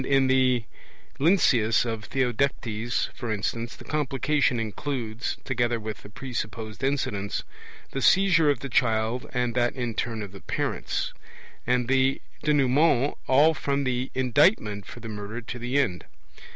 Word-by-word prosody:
In 135 0 +3
the 130 -2 +3 0.6
Lynceus 130 - +4
of 115 -2 -4
Theodectes, 120 -3 0
for 120 -3 -4
instance, 115 +3 -2
the - - -12
Complication 140 -3 +1
includes, 115 +1 -3
together 120 -2 0
with 110 -1 -6
the - - -12
presupposed 110 -2 -5
incidents, 115 -8 -1 0.5
the 135 - -3
seizure 175 -4 +5
of 140 -4 +1
the 140 - -4
child 115 -1 +1
and 125 -2 0
that 120 +1 +1
in 120 -3 -2
turn 110 0 -3
of 100 - -8
the 100 - -11
parents; - - -2 0.5
and 125 -1 +2
the 135 +1 +2 0.2
Denouement 145 -1 +3
all 145 +5 +5
from 140 -1 -1
the 130 0 -1
indictment 125 - +2
for 120 - -10
the 115 - -7
murder 105 +2 -5
to 120 +1 -7
the 125 +3 -1
end. 95 -11 0
125 Hz, 145 wpm, -26 LUFS, 115-135 Hz, 0.6 s, seizure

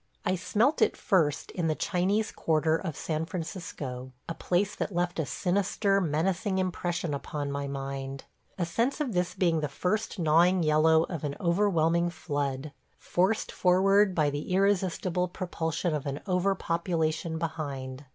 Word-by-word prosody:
I 180 - +2
smelt 220 - +1
it - - +3
first 160 - +1
in 170 -3 -1
the 155 - +1
Chinese 200 +6 0
Quarter 160 0 +1
of 165 -3 -3
San 155 -1 -2
Francisco 150 -8 -5
– - - -44
a 165 - -3
place 185 +4 0
that 195 - -4
left 175 0 0
a 155 - -1
sinister, 195 +1 +1
menacing 185 +5 0
impression 175 -3 -1
upon 140 0 -4
my 140 0 -3
mind. 135 0 -5 0.3
A 175 - 0
sense 230 - 0
of 275 -7 -1
this 180 0 0
being 170 -3 +2
the 150 - -1
first 215 +8 -2
gnawing 170 +2 +4
yellow 160 +1 +4
of 165 -3 -5
an 145 -1 -2
overwhelming 170 -3 +2
flood 145 -4 -3 0.2
– - - -41
forced 190 +5 0
forward 190 +2 +4
by 150 -3 +2
the 145 +5 -4
irresistible 185 -2 +1
propulsion 170 -2 -2
of 150 -1 -3
an 140 +1 -3
over 190 0 +1
population 165 -2 -1
behind. 145 -5 -4
170 Hz, 160 wpm, -28 LUFS, 155-185 Hz, 0.3 s, gnawing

